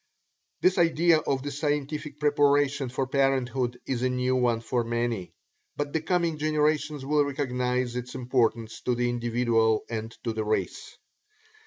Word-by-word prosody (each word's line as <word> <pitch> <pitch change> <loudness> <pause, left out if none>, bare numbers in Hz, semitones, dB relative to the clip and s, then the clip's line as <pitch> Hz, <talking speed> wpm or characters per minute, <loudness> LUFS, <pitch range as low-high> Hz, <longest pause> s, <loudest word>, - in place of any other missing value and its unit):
This 185 0 +3
idea 170 -1 +4
of 135 -3 -2
the 145 - -4
scientific 150 0 -3
preparation 145 -2 +2
for 130 +2 -1
parenthood 130 -2 0
is 125 -3 -2
a 130 - +2
new 125 0 0
one 120 -2 +2
for 120 +1 -1
many, 115 -5 -2 0.4
but 145 0 -3
the 160 - 0
coming 170 -2 0
generations 150 -2 0
will 150 +1 +3
recognize 125 -3 -1
its 125 +1 -5
importance 120 -3 0
to 125 - 0
the 120 0 0
individual 115 -2 +1
and 110 0 -3
to 115 - -2
the 110 0 -2
race. 110 0 -3
130 Hz, 150 wpm, -27 LUFS, 120-145 Hz, 0.4 s, idea